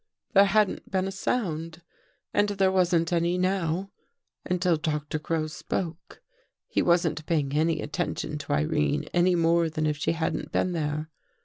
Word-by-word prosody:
There 200 Hz, -1 st, +7 dB
hadn't 210 Hz, 0 st, +1 dB
been 190 Hz, 0 st, 0 dB
a -, -, -3 dB
sound 170 Hz, -6 st, -2 dB, 0.5 s
and 205 Hz, 0 st, +3 dB
there 195 Hz, -2 st, +2 dB
wasn't 175 Hz, -2 st, +2 dB
any 170 Hz, +1 st, +1 dB
now, 185 Hz, 0 st, 0 dB, 0.5 s
until 180 Hz, -1 st, +1 dB
Doctor 150 Hz, 0 st, -2 dB
Crow 155 Hz, +1 st, -1 dB
spoke. 170 Hz, -, -5 dB, 0.4 s
He -, -, 0 dB
wasn't 170 Hz, -2 st, +2 dB
paying 145 Hz, -5 st, 0 dB
any 155 Hz, +1 st, +1 dB
attention 155 Hz, -2 st, -3 dB
to 140 Hz, -, -3 dB
Irene 75 Hz, 0 st, +1 dB
any 175 Hz, +1 st, +4 dB
more 165 Hz, 0 st, +3 dB
than 155 Hz, 0 st, -2 dB
if 150 Hz, -1 st, 0 dB
she 145 Hz, -, 0 dB
hadn't 165 Hz, -1 st, -2 dB
been 185 Hz, -, +1 dB
there. 155 Hz, -1 st, -2 dB
170 Hz, 150 wpm, -27 LUFS, 155-185 Hz, 0.5 s, There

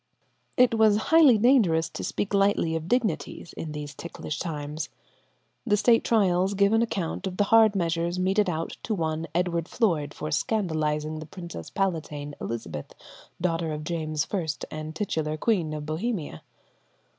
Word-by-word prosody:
It 250 Hz, -2 st, +5 dB
was 220 Hz, -2 st, +5 dB, 0.2 s
highly 300 Hz, -8 st, +8 dB
dangerous 210 Hz, -9 st, +4 dB
to -, -, -6 dB
speak 205 Hz, -, -2 dB
lightly 195 Hz, -5 st, +2 dB
of 160 Hz, 0 st, -3 dB
dignities 195 Hz, -, -1 dB
in 160 Hz, -, -6 dB
these 150 Hz, -1 st, -6 dB
ticklish 160 Hz, -3 st, -6 dB
times. 150 Hz, -2 st, -4 dB, 0.7 s
The 210 Hz, -3 st, +2 dB
State 230 Hz, +2 st, +4 dB
trials 195 Hz, -3 st, +2 dB
give 200 Hz, +2 st, +3 dB
an 225 Hz, -, +4 dB
account 195 Hz, -5 st, -2 dB
of 185 Hz, -1 st, -6 dB
the 205 Hz, -, +4 dB
hard 220 Hz, 0 st, +5 dB
measure 170 Hz, -2 st, 0 dB
meted 190 Hz, +2 st, +2 dB
out 165 Hz, -1 st, -3 dB
to 220 Hz, -, -2 dB
one 160 Hz, -2 st, -2 dB
Edward 170 Hz, -2 st, 0 dB
Floyde 160 Hz, -, 0 dB
for 155 Hz, -, -5 dB
scandalizing 155 Hz, -4 st, -1 dB
the 155 Hz, -, -8 dB
princess 170 Hz, -, -8 dB
palatine, 155 Hz, -6 st, -2 dB
Elizabeth, 85 Hz, -11 st, -5 dB, 0.4 s
daughter 165 Hz, -2 st, 0 dB
of 150 Hz, 0 st, -4 dB
James 155 Hz, -2 st, -2 dB
I, 180 Hz, -5 st, 0 dB, 0.2 s
and 155 Hz, 0 st, -6 dB
titular 160 Hz, -5 st, -2 dB
Queen 175 Hz, -4 st, +1 dB
of 150 Hz, -1 st, -5 dB
Bohemia. 160 Hz, -, -3 dB
170 Hz, 155 wpm, -26 LUFS, 155-205 Hz, 0.7 s, highly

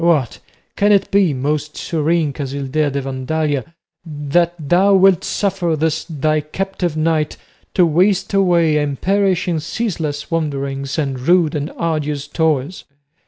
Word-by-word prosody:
What! 155 Hz, -8 st, +1 dB, 0.4 s
can 205 Hz, +1 st, +3 dB
it 200 Hz, -2 st, +3 dB
be, 195 Hz, -4 st, +4 dB
most 150 Hz, +3 st, -2 dB
serene 160 Hz, -2 st, 0 dB
Casildea 140 Hz, +2 st, -2 dB
de 140 Hz, 0 st, -3 dB
Vandalia, 140 Hz, +3 st, -2 dB, 0.3 s
that 165 Hz, +2 st, 0 dB
thou 180 Hz, +6 st, +3 dB
wilt 190 Hz, -2 st, +4 dB
suffer 185 Hz, -5 st, -1 dB
this 155 Hz, 0 st, -1 dB
thy 155 Hz, -1 st, 0 dB
captive 175 Hz, +1 st, -3 dB
knight 155 Hz, -1 st, 0 dB, 0.4 s
to 180 Hz, -, +5 dB
waste 190 Hz, +5 st, +2 dB
away 170 Hz, -5 st, +3 dB
and 145 Hz, -2 st, -1 dB
perish 195 Hz, -2 st, +1 dB
in 170 Hz, -3 st, 0 dB
ceaseless 160 Hz, -5 st, -3 dB
wanderings 140 Hz, -3 st, -2 dB
and 135 Hz, -4 st, -2 dB
rude 165 Hz, +3 st, +3 dB
and 150 Hz, +1 st, -3 dB
arduous 150 Hz, -3 st, -2 dB
toils? 155 Hz, +1 st, -1 dB
155 Hz, 135 wpm, -18 LUFS, 145-175 Hz, 0.4 s, to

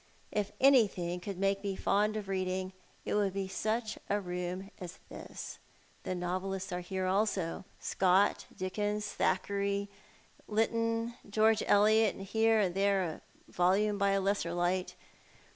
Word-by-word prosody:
If 210 Hz, -1 st, -1 dB
anything 200 Hz, -10 st, +4 dB
could 195 Hz, +1 st, -6 dB
make 195 Hz, +1 st, 0 dB
me 200 Hz, -1 st, -2 dB
fond 210 Hz, +3 st, +1 dB
of 205 Hz, -2 st, -5 dB
reading, 185 Hz, 0 st, -2 dB, 0.3 s
it -, -, -2 dB
would 200 Hz, -2 st, +1 dB
bj 195 Hz, -1 st, -2 dB
sucli 220 Hz, +2 st, -1 dB
a 205 Hz, -, +2 dB
room 180 Hz, +1 st, -4 dB
as 180 Hz, -1 st, -8 dB
this. -, -, -8 dB, 0.4 s
The 185 Hz, -, -3 dB
novelists 185 Hz, +2 st, -3 dB
are 180 Hz, -, -2 dB
here 185 Hz, +1 st, -3 dB
also, 190 Hz, -3 st, 0 dB
— -, -, -31 dB
Scott, 190 Hz, +2 st, +2 dB
Dickens, 205 Hz, +3 st, -2 dB
Thackeray, 200 Hz, 0 st, 0 dB, 0.6 s
Lytton, 230 Hz, +1 st, 0 dB, 0.2 s
George 220 Hz, +1 st, +3 dB
Eliot, 215 Hz, +1 st, +5 dB
and 195 Hz, -, -7 dB
lierc 220 Hz, 0 st, +3 dB
and 180 Hz, -, -2 dB
tliere 195 Hz, -2 st, +2 dB
a 160 Hz, -, -7 dB, 0.3 s
volume 200 Hz, +4 st, +2 dB
by 200 Hz, 0 st, +3 dB
a 195 Hz, -, +2 dB
Icssel 190 Hz, -3 st, 0 dB
light. 180 Hz, +1 st, 0 dB
195 Hz, 145 wpm, -32 LUFS, 185-210 Hz, 0.6 s, Eliot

